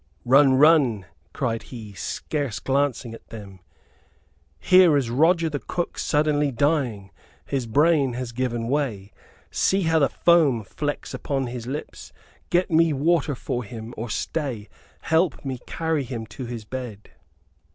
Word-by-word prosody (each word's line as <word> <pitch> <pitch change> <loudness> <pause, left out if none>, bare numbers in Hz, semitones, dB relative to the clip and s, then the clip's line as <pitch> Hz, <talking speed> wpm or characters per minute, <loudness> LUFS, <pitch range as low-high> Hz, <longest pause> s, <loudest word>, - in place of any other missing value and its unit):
"Run, 135 +1 +6
run," 135 - +4 0.3
cried 115 -4 -2
he, 110 -5 -9
scarce 140 +5 -3
glancing 135 -3 -1
at 115 - -13
them. 100 -4 -10 1.0
"Here 180 - +6
is 125 -5 -1
Roger 165 +6 +3
the 145 -2 -3
cook 175 +5 -4
suddenly 150 -1 +1
dying. 125 -8 0 0.3
His 135 -4 -2
brain 145 +1 +3
has 125 0 -4
given 120 -1 -2
way. 120 -8 -2 0.4
See 195 0 +1
how 160 -1 +3
the 140 - +3
foam 155 -10 +3
flecks 145 +9 -4
upon 135 -2 -2
his 120 -1 -6
lips. 145 +4 -7 0.4
Get 180 +1 +1
me 165 -1 +4
water 150 0 +1
for 120 0 -4
him. 115 +1 -8
Or 115 +2 -5
stay, 125 -5 -3 0.3
help 160 -2 +1
me 130 -2 -4
carry 160 -3 -1
him 120 -3 -6
to 130 -3 -6
his 115 -3 -6
bed." 120 -4 -7
135 Hz, 140 wpm, -24 LUFS, 115-155 Hz, 1.0 s, Run